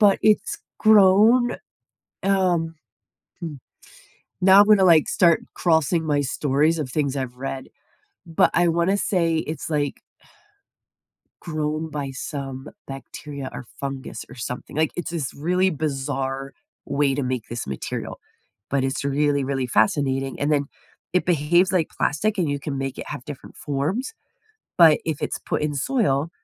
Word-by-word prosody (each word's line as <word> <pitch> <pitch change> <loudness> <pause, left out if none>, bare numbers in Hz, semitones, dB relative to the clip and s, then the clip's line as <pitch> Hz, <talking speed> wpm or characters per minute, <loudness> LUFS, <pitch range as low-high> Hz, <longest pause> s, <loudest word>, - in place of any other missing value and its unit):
but 205 -2 +5
it's 215 -1 +2 0.2
grown, 220 +4 +5 0.7
um, 180 -4 +1 0.7
hmm, 165 -4 -5 0.9
now 190 +2 +8
I'm 205 - +5
gonna, 205 -3 +6
like, 165 -4 +6
start 170 -3 +4
crossing 160 -1 +2
my 145 -2 +1
stories 145 +3 +1
of 145 - -2
things 140 0 -1
I've 125 -2 -4
read, 135 0 -5 0.6
but 165 -2 +2
I 175 0 +3
wanna 170 +4 +2
say 170 -5 +1
it's, 160 0 -4
like 145 -2 -1 1.4
grown 155 -1 -2
by 145 -2 -4
some 135 0 -6 0.2
bacteria 135 +1 -7
or - - -7 0.2
fungus 135 -1 -5
or - - -12
something, 125 +3 -6
like, 155 0 +1
it's 175 - -3
this 160 -6 -3
really 180 +5 +1
bizarre 135 -3 -3 0.3
way 140 -1 +1
to 145 - -2
make 125 -3 -3
this 120 0 -5
material, 65 -1 -5 0.5
but 135 -1 +1
it's 135 +1 -2
really 145 0 +1
really 135 -1 -1
fascinating, 135 +3 +1
and 145 +2 +1
then, 145 -1 +1 0.5
it 180 - +1
behaves 175 +3 +3
like 175 -4 +1
plastic, 210 +8 -1
and 170 -5 +1
you 145 - -1
can 140 -1 -4
make 135 -1 -3
it - - -7
have 125 - -6
different 145 -3 -9
forms, 160 - -2 0.6
but 165 -4 +7
if 160 -3 -3
it's - - -2
put - - -2
in 150 -1 -1
soil, 160 - +1
150 Hz, 150 wpm, -23 LUFS, 135-175 Hz, 1.4 s, now